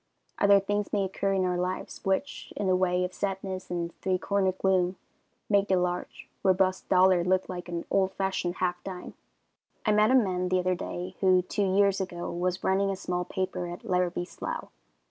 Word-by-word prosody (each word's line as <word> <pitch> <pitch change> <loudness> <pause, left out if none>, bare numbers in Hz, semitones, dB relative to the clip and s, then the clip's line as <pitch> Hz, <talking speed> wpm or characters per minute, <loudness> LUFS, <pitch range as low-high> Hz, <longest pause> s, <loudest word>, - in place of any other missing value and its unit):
Other 200 0 +6
things 205 +1 -2
may 205 -2 +1
occur 195 +1 -1
in 190 -1 +1
our 180 -1 0
lives, 185 +1 -4
which, 195 +10 -2
in 205 - -1
the 185 -1 +3
way 180 -1 +2
of 180 0 -3
sadness 190 -1 -4
and 170 -1 -3
three 185 -1 +1
cornered 190 0 0
gloom, 185 -1 +2 0.5
make 200 -1 +3
the 190 - +3
large, 180 0 -2
robust 185 -1 +2
dollar 185 -1 +5
look 185 +1 +1
like 180 -1 -6
an 170 -1 -4
old 190 -1 +2
fashioned 190 -2 -1
half 180 -1 -1
dime. 185 -2 -7 0.7
I 215 - +3
met 210 +1 +4
a 260 - +5
man 185 -7 +2
the 185 - +2
other 185 0 +1
day, 180 +1 -5
who, 185 -1 +4
two 190 0 0
years 200 -1 +3
ago, 175 -2 -4
was 180 +1 -2
running 195 +1 +2
a 195 - -1
small 180 -1 -3
paper 185 -1 -3
at 175 +4 -8
Larrabie's 180 -2 0
Slough. - - -5
185 Hz, 190 wpm, -28 LUFS, 180-195 Hz, 0.7 s, Other